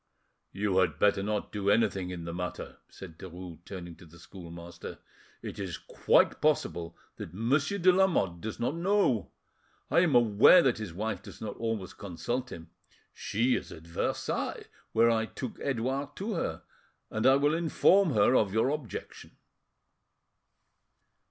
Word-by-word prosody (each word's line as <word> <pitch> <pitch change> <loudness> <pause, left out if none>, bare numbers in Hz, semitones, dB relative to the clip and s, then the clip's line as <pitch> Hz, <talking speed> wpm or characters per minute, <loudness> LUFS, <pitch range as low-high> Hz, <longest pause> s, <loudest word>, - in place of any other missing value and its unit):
"You 100 -1 -1
had 85 -5 +1
better 100 +2 +3
not 105 +1 -2
do 100 -1 -1
anything 100 -4 +2
in 85 -2 -6
the 85 - -5
matter;" 90 +1 -5
said 85 -4 -12
Derues, 90 -3 -9
turning 85 -4 -8
to - - -15
the 80 +2 -16
schoolmaster. 85 0 -10 0.5
"It - - -7
is 95 -4 -4
quite - - +2
possible 85 - 0 0.2
that 85 - -8
Monsieur 140 - +1
de 185 -1 +5
Lamotte 170 - +2
does 110 - -5
not 120 - 0
know. 170 - +1 0.6
I - - +5
am 170 -6 +3
aware 120 - +7
that 125 -4 +1
his 110 -5 -5
wife 110 +6 -3
does - - -12
not 105 -2 -5
always 115 -5 -3
consult 100 +8 -4
him. 80 0 -10 0.4
She 120 +5 0
is - - -5
at 80 - -10
Versailles, 85 0 -3 0.3
where 115 +1 +4
I 110 -1 +1
took 125 0 -7
Edouard 135 +2 -2
to 210 +3 -3
her, 170 - -3 0.5
and 110 +3 +1
I 135 - +7
will 145 +2 +2
inform 170 +1 +3
her 105 +5 +4
of 105 -5 +3
your 110 +4 +3
objection." 145 -5 -6
110 Hz, 155 wpm, -29 LUFS, 90-135 Hz, 0.6 s, aware